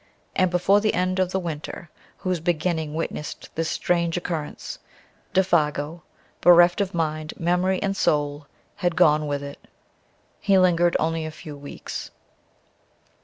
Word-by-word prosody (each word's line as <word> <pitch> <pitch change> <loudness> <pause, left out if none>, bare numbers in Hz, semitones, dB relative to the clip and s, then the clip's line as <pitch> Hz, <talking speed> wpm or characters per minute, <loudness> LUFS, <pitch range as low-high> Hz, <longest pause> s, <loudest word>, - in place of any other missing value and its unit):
And 185 -1 +3
before 185 +3 +3
the 215 - +1
end 185 +1 0
of 185 -1 +1
the 190 - 0
winter 165 0 -6 0.3
whose 185 -2 -1
beginning 160 -2 -1
witnessed 160 -2 -5
this 165 0 -1
strange 170 -1 0
occurrence, 165 -4 -5 0.5
Défago, 165 -3 +1 0.4
bereft 175 +2 +6
of 195 -2 -2
mind, 155 -1 -2
memory 180 +2 +1
and 195 -1 0
soul, 145 -4 0 0.3
had 175 -4 0
gone 155 -4 +4
with 145 -1 -2
it. 140 0 -8 0.8
He 195 -2 +3
lingered 175 -2 +4
only 165 +1 0
a 155 - -4
few 155 -1 -9
weeks. 145 0 -7
170 Hz, 135 wpm, -24 LUFS, 155-180 Hz, 0.8 s, bereft